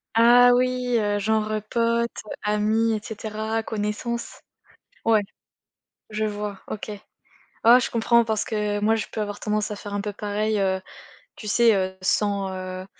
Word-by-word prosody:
Ah 245 Hz, +2 st, +7 dB
oui, 250 Hz, -1 st, +1 dB
heu, 205 Hz, -1 st, 0 dB
genre, 215 Hz, +1 st, 0 dB, 0.2 s
potes, 235 Hz, 0 st, 0 dB, 0.2 s
amis 215 Hz, +2 st, +1 dB
et 215 Hz, -, -1 dB
cetera, 220 Hz, +1 st, -4 dB
connaissances? 220 Hz, +3 st, -4 dB, 0.6 s
Ouais. 220 Hz, -2 st, +4 dB, 0.9 s
Je 215 Hz, 0 st, -1 dB
vois. 205 Hz, -1 st, -4 dB
OK. 215 Hz, -, -6 dB, 0.7 s
Oh 235 Hz, +2 st, +8 dB
je 245 Hz, -, -2 dB
comprends 235 Hz, 0 st, +3 dB
parce 220 Hz, -2 st, -1 dB
que 210 Hz, -1 st, -1 dB
moi, 220 Hz, +2 st, +3 dB
je 220 Hz, -, -3 dB
peux 215 Hz, -, -3 dB
avoir 205 Hz, -1 st, -3 dB
tendance 210 Hz, 0 st, -1 dB
à 210 Hz, -, -4 dB
faire 205 Hz, 0 st, -8 dB
un 205 Hz, -, -1 dB
peu 205 Hz, 0 st, -4 dB
pareil, 210 Hz, +1 st, -1 dB
heu, 190 Hz, -1 st, +1 dB, 0.6 s
tu 215 Hz, -, -9 dB
sais, 230 Hz, +2 st, +4 dB
heu, 190 Hz, -1 st, -1 dB
sans, 200 Hz, 0 st, +1 dB
heu, 185 Hz, 0 st, -6 dB
215 Hz, 155 wpm, -24 LUFS, 205-230 Hz, 0.9 s, Oh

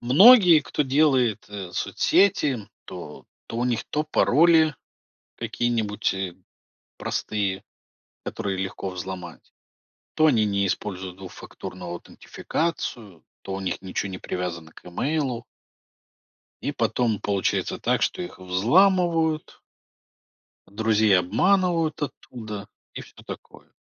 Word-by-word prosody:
многие, 180 Hz, -, +8 dB
кто 150 Hz, -, -1 dB
делает 130 Hz, -5 st, +2 dB, 0.3 s
соцсети, 140 Hz, -, +2 dB, 0.2 s
то 85 Hz, -5 st, -9 dB, 0.2 s
то -, -, -5 dB
у 120 Hz, -, 0 dB
них 120 Hz, -2 st, 0 dB
то 150 Hz, +1 st, -2 dB
пароли 160 Hz, +1 st, +4 dB, 0.6 s
какие-нибудь, 115 Hz, -3 st, -1 dB
э, 95 Hz, -2 st, -4 dB, 0.6 s
простые, 100 Hz, -2 st, -2 dB, 0.6 s
которые 100 Hz, -1 st, -3 dB
легко 95 Hz, 0 st, -4 dB
взломать, 90 Hz, -1 st, -8 dB, 0.6 s
то 155 Hz, -, +4 dB
они 115 Hz, -7 st, +3 dB
не 100 Hz, -1 st, +1 dB
используют 95 Hz, -1 st, -4 dB
двухфакторную 90 Hz, -1 st, -9 dB
аутентификацию, 105 Hz, -, -4 dB, 0.2 s
то 95 Hz, -, -6 dB
у -, -, -4 dB
них 95 Hz, -2 st, -3 dB
ничё 95 Hz, +1 st, -3 dB
не 95 Hz, -1 st, -6 dB
привязано 85 Hz, -3 st, -5 dB
к -, -, -17 dB
имейлу. 130 Hz, -, -2 dB, 1.2 s
И -, -, -1 dB
потом 115 Hz, -5 st, 0 dB
получается 100 Hz, -2 st, -1 dB
так, 125 Hz, +2 st, +1 dB
что -, -, 0 dB
их 175 Hz, -, -8 dB
взламывают 160 Hz, -, +2 dB, 1.1 s
друзей 110 Hz, 0 st, +2 dB
обманывают 170 Hz, -, +2 dB
оттуда, 110 Hz, -7 st, -6 dB, 0.3 s
и -, -, -5 dB
всё -, -, -15 dB
такое. -, -, -10 dB
110 Hz, 110 wpm, -24 LUFS, 95-155 Hz, 1.2 s, многие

